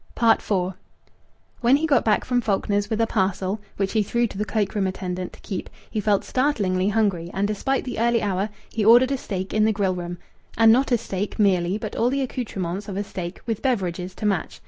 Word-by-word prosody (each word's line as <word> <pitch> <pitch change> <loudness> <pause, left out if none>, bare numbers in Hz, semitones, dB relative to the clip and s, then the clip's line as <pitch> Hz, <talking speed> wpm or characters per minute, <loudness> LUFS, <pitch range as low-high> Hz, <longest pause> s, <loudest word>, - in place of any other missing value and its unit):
IV 230 -2 +3 1.1
When 245 +2 +5
he 300 +3 +1
got 285 -5 +3
back 215 -2 +2
from 245 -1 +1
Faulkner's 205 -1 0
with 220 - -1
a - - +4
parcel 195 -1 -1 0.2
(which 195 -1 0
he 220 - +2
threw 235 +4 +1
to 210 - -6
the 210 - 0
cloak 205 -1 -1
room 200 -2 +1
attendant 185 -1 -4
to - - -14
keep) 190 -4 -5 0.2
he 215 - -1
felt 205 -1 +2
startlingly 205 -9 +1
hungry, 200 -6 0
and, 200 +1 +1
despite 260 +6 -1
the 250 -4 -5
early 235 -1 +2
hour, 200 +1 0 0.2
he 220 - -1
ordered 240 +5 +6
a 275 - +1
steak 190 -4 -4
in 215 0 +3
the 220 - +3
grill 200 -3 0
room; 175 -1 -5 0.4
and 225 0 +7
not 260 +3 +3
a 240 - +5
steak 200 -2 -4
merely, 190 -3 +2
but 215 -1 -6
all 235 - +2
the 275 +2 0
accoutrements 205 -6 -4
of 195 - -4
a 205 - 0
steak, 180 -3 -6
with 225 -3 -2
beverages 185 -7 -1
to - - -5
match. 195 -5 -1
210 Hz, 215 wpm, -24 LUFS, 190-230 Hz, 1.1 s, and